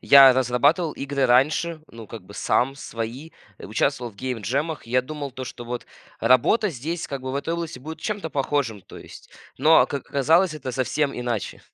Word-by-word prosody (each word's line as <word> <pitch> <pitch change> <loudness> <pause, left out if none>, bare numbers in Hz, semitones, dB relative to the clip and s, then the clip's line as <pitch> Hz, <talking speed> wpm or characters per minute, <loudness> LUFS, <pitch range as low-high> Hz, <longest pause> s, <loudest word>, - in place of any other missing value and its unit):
я 135 -2 +8
разрабатывал 140 +6 +2
игры 140 -1 -1
раньше, 155 +6 +2
ну, 115 -2 -11
как 115 -1 -9
бы, 95 +3 -14
сам, 135 +6 0
свои, 120 +5 -6 0.3
а - - -10
участвовал 120 +2 -1
в - - -25
гейм-джемах. 130 - -3
Я 125 +2 +2
думал, 145 -1 -6
то, 130 0 -6
что 120 -1 -8
вот 120 0 -5 0.4
работа 210 - +4
здесь, 160 +5 -5
как 140 -2 -5
бы, 130 0 -4
в - - -4
этой 160 +4 -2
области 165 -7 -5
будет 160 +4 -8
чем-то 205 -7 -3
похожим, 135 -7 -1
то - - -13
есть. - - -13 0.3
Но, 160 +1 +6
как 140 -2 -5
оказалось, 160 +5 +3
это 130 -4 -5
совсем 135 +3 0
иначе. 120 -4 -3
135 Hz, 185 wpm, -24 LUFS, 125-155 Hz, 0.4 s, я